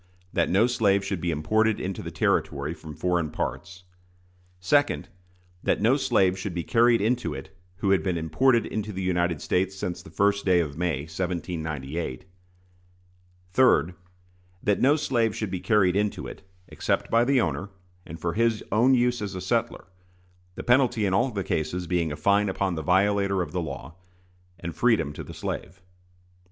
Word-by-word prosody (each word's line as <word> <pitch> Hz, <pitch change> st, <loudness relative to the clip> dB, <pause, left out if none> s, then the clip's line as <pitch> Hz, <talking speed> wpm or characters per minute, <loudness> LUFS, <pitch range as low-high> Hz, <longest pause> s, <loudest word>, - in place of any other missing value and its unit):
That -, -, +1 dB
no 100 Hz, +5 st, +4 dB
slave 100 Hz, -5 st, +2 dB
should 95 Hz, -3 st, -3 dB
be 85 Hz, -, -1 dB
imported 110 Hz, +8 st, +1 dB
into 95 Hz, 0 st, -4 dB
the -, -, -6 dB
Territory 70 Hz, +3 st, 0 dB
from 80 Hz, -2 st, -10 dB
foreign 85 Hz, -2 st, 0 dB
parts. 85 Hz, +3 st, -5 dB, 0.8 s
2d. 145 Hz, +10 st, +2 dB, 0.6 s
That -, -, +1 dB
no -, -, +4 dB
slave 95 Hz, 0 st, +2 dB
should 95 Hz, -2 st, -4 dB
be 85 Hz, -, -2 dB
carried 115 Hz, +1 st, +3 dB
into 120 Hz, +4 st, 0 dB
it 95 Hz, -, -10 dB, 0.2 s
who 100 Hz, +1 st, 0 dB
had 95 Hz, -4 st, +4 dB
been 85 Hz, +1 st, -1 dB
imported 115 Hz, -, +2 dB
into 105 Hz, 0 st, -4 dB
the 95 Hz, -1 st, -4 dB
United 85 Hz, -3 st, 0 dB
States 95 Hz, +1 st, 0 dB
since 90 Hz, -2 st, -4 dB
the 95 Hz, -, -13 dB
first 100 Hz, 0 st, +1 dB
day 90 Hz, -2 st, +4 dB
of 75 Hz, -4 st, -2 dB
May, 85 Hz, -4 st, -1 dB
1798. 80 Hz, -4 st, -4 dB, 1.3 s
3d. 90 Hz, -8 st, +4 dB, 0.7 s
That 105 Hz, -1 st, +1 dB
no 140 Hz, +3 st, +5 dB
slave 120 Hz, -7 st, 0 dB
should 110 Hz, -4 st, -3 dB
be 95 Hz, -, -2 dB
carried 95 Hz, -4 st, +2 dB
into 105 Hz, 0 st, -1 dB
it, -, -, -9 dB, 0.3 s
except -, -, -2 dB
by 115 Hz, +1 st, +5 dB
the 135 Hz, +1 st, +3 dB
owner, 85 Hz, -, -1 dB, 0.3 s
and 80 Hz, 0 st, -9 dB
for 85 Hz, +1 st, -2 dB
his 115 Hz, +1 st, +1 dB
own 120 Hz, +6 st, +4 dB
use 120 Hz, -1 st, +1 dB
as 100 Hz, -2 st, -4 dB
a -, -, -4 dB
settler; 95 Hz, -, -1 dB, 0.7 s
the -, -, -6 dB
penalty 120 Hz, -3 st, +3 dB
in 95 Hz, -, 0 dB
all 120 Hz, +7 st, +2 dB
the 100 Hz, -5 st, -3 dB
cases 80 Hz, +3 st, -2 dB
being 85 Hz, -2 st, 0 dB
a -, -, -3 dB
fine 100 Hz, +6 st, +2 dB
upon 95 Hz, -1 st, -1 dB
the 80 Hz, -, -3 dB
violator 100 Hz, +2 st, +2 dB
of 75 Hz, -, -8 dB
the 90 Hz, -, -2 dB
law, 70 Hz, -1 st, -7 dB, 0.7 s
and 85 Hz, -1 st, -6 dB
freedom 110 Hz, -, +2 dB
to -, -, -7 dB
the -, -, -10 dB
slave. 95 Hz, -, -5 dB
95 Hz, 175 wpm, -26 LUFS, 85-110 Hz, 1.3 s, no